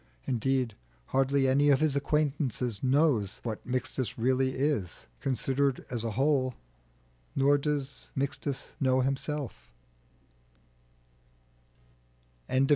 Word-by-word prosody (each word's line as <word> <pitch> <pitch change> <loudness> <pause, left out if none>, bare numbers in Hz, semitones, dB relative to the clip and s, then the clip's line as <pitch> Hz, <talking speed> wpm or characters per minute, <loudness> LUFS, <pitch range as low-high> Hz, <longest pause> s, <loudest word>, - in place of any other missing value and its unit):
Indeed, 130 -1 0 0.4
hardly 135 0 +2
any 140 +2 +4
of 140 - +5
his 155 -2 +2
acquaintances 140 -6 0
know 135 -3 +3 0.2
what 110 -3 -4
Mixtus 130 0 -2
really 130 +2 +2
is, 130 - -1
considered 135 0 0
as 120 -3 -2
a 115 -2 -2
whole 135 -2 +2 0.8
nor 140 +1 +4
does 140 -2 -3
Mixtus 135 0 -2
himself 130 - -1 2.8
know - - +1
it. - - -3
135 Hz, 100 wpm, -29 LUFS, 125-140 Hz, 2.8 s, of